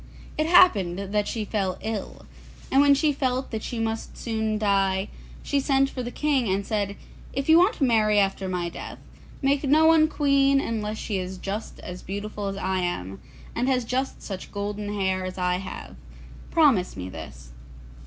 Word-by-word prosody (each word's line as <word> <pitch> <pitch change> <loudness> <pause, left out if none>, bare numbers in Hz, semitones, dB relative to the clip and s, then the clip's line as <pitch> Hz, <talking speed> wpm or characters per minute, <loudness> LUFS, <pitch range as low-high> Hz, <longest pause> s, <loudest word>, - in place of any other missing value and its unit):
It 310 +1 0
happened 205 - +5 0.2
that 210 -1 +1
she 220 -2 -3
fell 195 -3 -1
ill, 220 -2 -5 0.5
and 270 - +5
when 285 -1 +6
she 295 +1 +2
felt 260 -1 -1
that 220 -2 -3
she 240 - -5
must 225 0 -3
soon 220 -2 -1
die, 195 -1 +1 0.3
she 285 - +1
sent 270 0 +2
for 255 - -4
the 240 - -4
King, 265 -6 0
and 195 +1 0
said, 205 -2 -1 0.4
'If 275 +1 -2
you 320 +1 +7
want 385 +6 +4
to - - -2
marry 215 -4 +3
after 195 -1 +1
my 180 -2 -2
death, 170 - -8 0.5
make 275 +1 +2
no 300 +3 +4
one 320 -1 +6
queen 275 -2 +3
unless 215 -4 -3
she 205 -3 -3
is 185 +1 -5
just 200 +4 -5
as 180 0 -8
beautiful 205 +1 -5
as 195 0 -4
I 190 -1 -1
am, 95 - -3 0.3
and 245 +2 0
has 255 -2 +1
just 260 +3 -2
such 190 -3 -7
golden 205 0 -4
hair 190 -2 0
as 185 0 -5
I 180 -1 +1
have. 180 - -8 0.5
Promise 270 - +3
me 90 0 -5
this. 65 -8 -10
215 Hz, 185 wpm, -25 LUFS, 190-270 Hz, 0.5 s, you